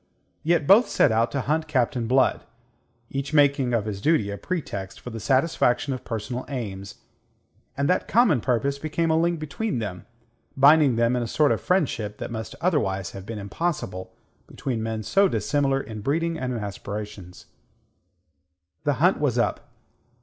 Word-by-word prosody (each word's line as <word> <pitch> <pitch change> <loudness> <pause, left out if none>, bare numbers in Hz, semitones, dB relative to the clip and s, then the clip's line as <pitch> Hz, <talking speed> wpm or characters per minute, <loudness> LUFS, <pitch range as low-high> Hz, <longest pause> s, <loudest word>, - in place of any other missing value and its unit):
Yet 165 -2 +1
both 205 - +6
set - - +3
out 115 +2 +2
to 140 - -1
hunt 155 +4 -1
Captain 125 -5 0
Blood, 130 +2 +2 0.7
each 140 +2 -3
making 140 -3 +4
of 110 -3 0
his 100 -2 -5
duty 130 -8 +2
a 100 - -5
pretext 100 - -5
for 125 - -8
the 115 - -6
satisfaction 135 - +1
of 130 - -6
personal 120 +2 -4
aims; 100 -8 -5 0.8
and 140 +1 +1
that 180 - +1
common 210 - +4
purpose 135 +3 0
became 160 +2 -1
a - - +3
link 170 +1 +1
between 155 - -3
them, 95 -6 -5 0.5
binding 140 -1 +6
them 115 +1 +2
in 125 - 0
a 120 - -2
sort 150 +5 +2
of - - 0
friendship 130 - 0
that - - -6
must 110 -1 -6
otherwise 100 - 0
have 95 0 -10
been 115 - -5
impossible 100 - -3 0.4
between 125 -5 -4
men 110 -1 -3
so 195 - +3
dissimilar 140 -6 0
in 110 -5 -7
breeding 165 +8 0
and 130 -5 -3
in 120 - -2
aspirations. 100 -2 -7 1.4
The 145 - +3
hunt 175 +8 +2
was 135 -5 0
up. 120 -3 -1
130 Hz, 165 wpm, -24 LUFS, 110-155 Hz, 1.4 s, both